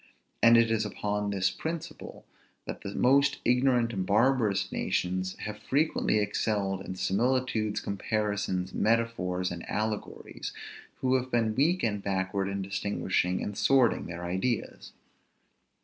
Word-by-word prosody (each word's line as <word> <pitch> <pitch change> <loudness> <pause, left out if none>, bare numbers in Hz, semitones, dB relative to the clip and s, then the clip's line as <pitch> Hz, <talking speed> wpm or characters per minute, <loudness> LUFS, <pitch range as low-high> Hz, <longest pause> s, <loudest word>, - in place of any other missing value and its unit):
And 115 0 +7
it 115 -1 +4
is 110 -1 +2
upon 105 0 -2
this 95 -2 +1
principle, 165 +1 -6 0.4
that - - -6
the 100 - -6
most 140 +2 +4
ignorant 125 -1 +3
and 95 -3 -1
barbarous 110 0 +2
nations 95 +1 -1
have 105 0 -5
frequently 145 -5 +1
excelled 105 -2 0
in 95 - -6
similitudes, 110 +2 0
comparisons, 100 -2 -2
metaphors, 105 -6 0
and 85 -1 -6
allegories, 105 0 -4 0.5
who 130 0 +2
have 130 0 -4
been 115 -3 +1
weak 160 +9 +2
and 105 -3 0
backward 95 0 -1
in 100 0 -3
distinguishing 95 -2 -1
and 105 - -4
sorting 130 0 +3
their 85 0 -6
ideas. 95 +6 -2
105 Hz, 130 wpm, -29 LUFS, 95-120 Hz, 0.5 s, And